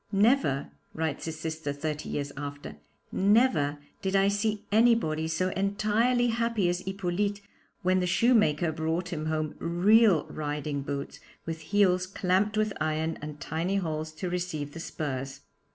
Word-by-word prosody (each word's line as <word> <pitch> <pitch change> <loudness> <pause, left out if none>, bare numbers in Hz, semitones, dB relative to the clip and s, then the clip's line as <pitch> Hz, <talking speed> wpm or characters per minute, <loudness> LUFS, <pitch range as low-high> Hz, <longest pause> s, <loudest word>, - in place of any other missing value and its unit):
'Never,' 205 - +2 0.2
writes 160 0 -2
his 160 -1 -5
sister 160 -2 -3
thirty 150 +1 -4
years 140 -1 -3
after, 145 0 -7 0.3
'never 200 - +3 0.2
did 190 0 -1
I 195 0 +4
see 210 +1 -1
anybody 215 -9 +3
so 165 +3 0
entirely 215 +6 +1
happy 230 -4 +1
as 175 0 0
Hippolyte 195 +2 -2 0.4
when 185 +1 +3
the 180 - 0
shoemaker 175 -6 +3
brought 160 +3 -2
him 155 -1 -3
home 155 -1 -1
real 190 +1 +4
riding 150 -1 -3
boots 140 0 -5 0.3
with 165 -1 -4
heels 185 +1 +2
clamped 195 +3 +1
with 215 -1 +1
iron, 155 +1 -1
and 150 0 -7
tiny 165 +6 -2
holes 155 -4 -2
to 155 +4 -4
receive 175 -5 -3
the 165 - -7
spurs. 135 -4 -4
175 Hz, 145 wpm, -28 LUFS, 155-205 Hz, 0.4 s, I